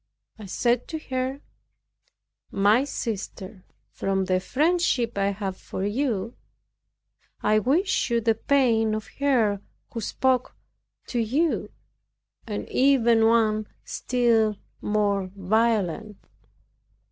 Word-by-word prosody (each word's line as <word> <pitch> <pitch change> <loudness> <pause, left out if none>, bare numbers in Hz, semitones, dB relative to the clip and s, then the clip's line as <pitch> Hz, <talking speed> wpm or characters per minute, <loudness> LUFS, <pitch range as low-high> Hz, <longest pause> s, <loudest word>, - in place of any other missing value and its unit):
I 210 - -8
said 240 +5 0
to 320 - -4
her, 260 +2 -2 1.1
"My 210 +7 +3
sister, 205 -6 -5 0.3
from 195 -1 -1
the 185 0 +1
friendship 280 - +1
I 200 -1 +1
have 195 -1 -4
for 190 - -5
you 225 -1 -1 1.1
I 215 0 +4
wish 300 - +1
you 235 -1 +2
the 225 0 +2
pain 225 -3 +2
of 215 - -4
her 230 -8 +2 0.3
who 230 - -3
spoke 255 +3 0 0.5
to 245 - -2
you, 275 +9 0 0.8
and 210 -2 -4
even 235 -4 +4
one 215 -2 +2 0.2
still 230 -4 +1 0.2
more 205 -2 0
violent." 210 0 0
225 Hz, 105 wpm, -25 LUFS, 205-255 Hz, 1.1 s, I